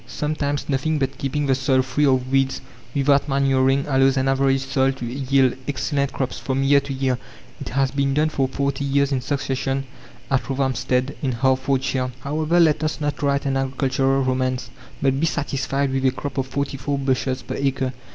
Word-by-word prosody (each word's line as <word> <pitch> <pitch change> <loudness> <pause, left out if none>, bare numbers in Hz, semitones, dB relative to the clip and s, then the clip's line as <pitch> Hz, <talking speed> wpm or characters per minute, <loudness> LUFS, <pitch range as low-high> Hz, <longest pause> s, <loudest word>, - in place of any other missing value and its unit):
Sometimes 145 -1 -2
nothing 145 +3 0
but 135 -1 -2
keeping 145 +2 -1
the 135 - +3
soil 130 0 +2
free 130 +3 +1
of 130 -1 +1
weeds, 135 0 +2 0.4
without 140 +1 +3
manuring, 135 0 +2
allows 135 -1 +3
an 130 0 +1
average 135 0 +2
soil 135 0 +2
to 130 -2 -6
yield 130 +1 +1
excellent 140 0 -1
crops 130 -4 -3
from 130 +3 -1
year 140 +1 +5
to 140 0 -7
year. 130 -2 0 0.4
It - - -6
has 135 +1 +1
been 140 -1 0
done 155 +1 +2
for 135 -3 0
forty 140 +1 -2
years 140 0 +1
in 130 -2 0
succession 135 0 -2 0.5
at 135 - +3
Rothamstead, 130 0 0
in 130 -3 0
Hertfordshire. 130 0 0
However, 155 +5 +1
let 155 -2 +4
us 155 +1 -1
not 145 -2 -2
write 140 -1 +1
an 135 -1 0
agricultural 135 0 +1
romance, 130 0 -1 0.3
but 135 0 +2
be 165 - +2
satisfied 140 -2 -1
with 135 0 0
a 130 - +4
crop 140 +2 -5
of 130 - -1
44 140 0 -2
bushels 130 -1 -1
per - - -5
acre. 135 -1 -1
135 Hz, 180 wpm, -22 LUFS, 130-140 Hz, 0.5 s, year